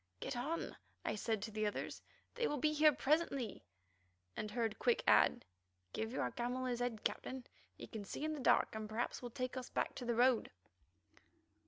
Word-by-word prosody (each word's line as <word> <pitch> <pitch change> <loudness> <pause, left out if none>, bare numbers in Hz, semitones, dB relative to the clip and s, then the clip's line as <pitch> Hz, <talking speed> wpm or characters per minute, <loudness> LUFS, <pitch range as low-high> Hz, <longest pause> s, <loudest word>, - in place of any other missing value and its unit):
"Get - - -3
on," 290 +8 -2 0.3
I - - +1
said 215 -1 -1
to 220 - -4
the 215 0 0
others; 205 - -3 0.3
"they 475 -1 +1
will 295 - -1
be 305 +3 +2
here 305 0 +7
presently," 280 - +1 0.7
and 215 - -3
heard 225 -1 -1
Quick 485 0 +3
add: 240 - +5 0.5
"Give 220 +1 -2
your 260 - -1
camel 250 +1 -2
his 245 -1 -1
head, 245 -3 -2
Captain; 260 -1 -2 0.3
he - - -8
can 220 -3 -6
see 285 - -4
in 310 - 0
the 300 - -4
dark, 255 - +4
and 215 -1 -4
perhaps 225 +3 -2
will 245 - -5
take 255 +2 -3
us 255 -1 -4
back - - 0
to 250 - -6
the 235 -1 +1
road." 245 0 +4
245 Hz, 190 wpm, -38 LUFS, 225-280 Hz, 0.7 s, here